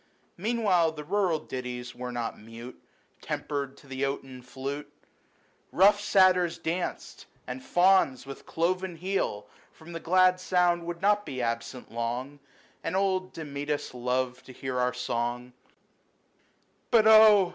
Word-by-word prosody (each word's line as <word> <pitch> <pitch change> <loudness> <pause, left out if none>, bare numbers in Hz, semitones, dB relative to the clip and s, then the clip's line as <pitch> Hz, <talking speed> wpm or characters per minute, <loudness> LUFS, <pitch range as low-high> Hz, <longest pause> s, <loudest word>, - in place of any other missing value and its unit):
Meanwhile 190 -5 +2
the 150 -1 -7
rural 185 0 +1
ditties 125 -3 -6
were 125 0 -6
not 120 -2 -4
mute, 115 +3 -11 0.4
Tempered 140 -2 -4
to 140 - -18
the 135 0 -4
oaten 135 -2 -4
flute; 135 +3 -6 0.8
Rough 205 +3 +5
Satyrs 185 -4 +4
danced, 175 +2 -4 0.2
and 125 +1 -6
Fauns 175 -6 +3
with 135 0 -10
cloven 180 +2 -1
heel 175 - -2 0.3
From 160 +2 -14
the 165 - -4
glad 185 +2 +4
sound 175 -2 +1
would 175 +1 -5
not 205 +1 +3
be 130 -9 -6
absent 115 +1 -3
long; 120 +5 -4 0.4
And 165 - -2
old 190 -1 0
Damcetas 145 -2 -4
loved 125 0 -2
to 130 - -10
hear 130 0 -4
our 125 0 +2
song^X 120 0 -3 1.4
But, 225 -3 +5
oh 215 -4 +8
150 Hz, 135 wpm, -28 LUFS, 125-185 Hz, 1.4 s, oh